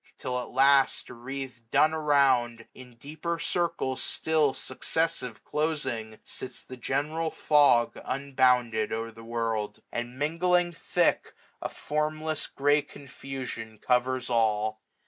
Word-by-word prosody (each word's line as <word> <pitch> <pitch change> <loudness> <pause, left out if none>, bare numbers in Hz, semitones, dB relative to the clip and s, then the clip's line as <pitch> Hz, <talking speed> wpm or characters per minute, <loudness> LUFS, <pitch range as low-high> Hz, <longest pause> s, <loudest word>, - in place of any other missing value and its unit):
Till 125 -1 -2
at 125 - -6
last 135 +1 +4
725 120 0 -12
Wreath'd 130 -3 -7
dun 155 +5 +4
around, 135 -7 +2
in 125 -2 -13
deeper 155 +7 -4
circles 165 -6 -1
still 155 -3 +2
Successive 130 -3 -2
closing, 130 -8 -2
sits 130 - -6
the 130 - -9
general 150 +6 -1
fog 145 -7 +3
Unbounded 125 -5 +1
o'er 115 +1 -3
the 115 0 -13
world; 115 -2 -3
and, 120 +1 -4
mingling 175 +4 +2
thick, - - 0 0.3
A - - -3
formless 155 +1 -2
grey 145 +2 +2
confusion 130 -6 -8
covers 125 +2 +1
all. 110 -2 +1
130 Hz, 120 wpm, -28 LUFS, 120-150 Hz, 0.3 s, last